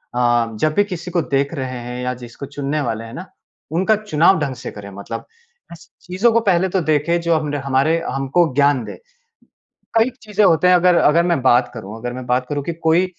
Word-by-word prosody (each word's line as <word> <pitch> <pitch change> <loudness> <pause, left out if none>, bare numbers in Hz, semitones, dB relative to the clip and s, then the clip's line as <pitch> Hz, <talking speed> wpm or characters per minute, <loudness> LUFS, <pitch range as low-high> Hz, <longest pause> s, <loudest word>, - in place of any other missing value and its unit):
अ, 120 -1 +2
जब 155 +4 +1
भी 205 - +3
किसी 180 -3 -6
को 175 - +1
देख 140 0 -1
रहे 130 -4 -4
हैं 125 +1 -6
या 125 0 -1
जिसको 120 +3 -9
चुनने 145 +2 -3
वाले 115 -4 -3
हैं 115 0 -10
ना, - - -7 0.5
उनका 190 +7 +2
चुनाव 190 -3 +2
ढंग 140 -3 -2
से 125 - -7
करें 100 -1 -10
मतलब 110 +3 -7 0.5
ऐसी 170 - -13 0.2
चीज़ों 190 +7 +2
को 230 - +4
पहले 190 -4 +2
तो 190 - +3
देखें 155 +2 +1
जो 170 -1 +1
हम 150 -2 -3
हमारे 140 +5 +2
हमको 135 +4 +1
ज्ञान 140 -3 +3
दें। - - -8 1.0
कई 225 +3 +4
चीजें 210 -1 0
होती 180 -1 +4
हैं 180 - +6
अगर 180 0 +4
अगर 170 +1 +4
मैं 170 -5 +1
बात 125 -1 +3
करूँ 110 -1 -8
अगर 120 +1 -5
मैं 130 0 -7
बात 125 +1 0
करूँ 145 -1 -2
कि 170 - -3
कोई 165 +2 +2
150 Hz, 215 wpm, -19 LUFS, 125-175 Hz, 1.0 s, हैं